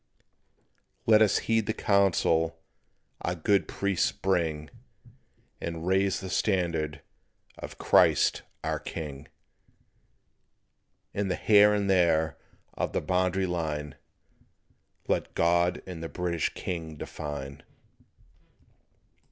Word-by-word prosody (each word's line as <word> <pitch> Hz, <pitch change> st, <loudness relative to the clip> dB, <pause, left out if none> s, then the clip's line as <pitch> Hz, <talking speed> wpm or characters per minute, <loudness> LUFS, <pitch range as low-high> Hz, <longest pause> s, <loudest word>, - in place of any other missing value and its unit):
"Let 110 Hz, -1 st, +6 dB
us 105 Hz, -3 st, +4 dB
heed 115 Hz, -1 st, +1 dB
the 110 Hz, -, -1 dB
counsel 85 Hz, -5 st, +2 dB, 0.6 s
our 85 Hz, -, -2 dB
good 95 Hz, +4 st, +1 dB
priests 100 Hz, -2 st, 0 dB
bring, 85 Hz, -6 st, -1 dB, 0.9 s
And 85 Hz, 0 st, -5 dB
raise 95 Hz, +1 st, +1 dB
the 95 Hz, -, -6 dB
standard 85 Hz, -8 st, 0 dB, 0.6 s
of -, -, -8 dB
Christ -, -, +4 dB, 0.2 s
our -, -, -1 dB
King, 75 Hz, -2 st, -7 dB, 1.9 s
And 100 Hz, -1 st, -1 dB
the 90 Hz, -, 0 dB
here 105 Hz, -1 st, +5 dB
or -, -, +1 dB
there 85 Hz, -5 st, +2 dB, 0.4 s
of -, -, -3 dB
the -, -, 0 dB
Boundary 95 Hz, +1 st, +1 dB
Line 75 Hz, -5 st, -3 dB, 1.1 s
Let -, -, -1 dB
God 85 Hz, +1 st, +2 dB
and 90 Hz, -3 st, -7 dB
the 80 Hz, -, -5 dB
British 85 Hz, -3 st, -1 dB
king 80 Hz, -3 st, -5 dB
define." 70 Hz, -2 st, -7 dB
90 Hz, 105 wpm, -28 LUFS, 80-95 Hz, 1.9 s, Let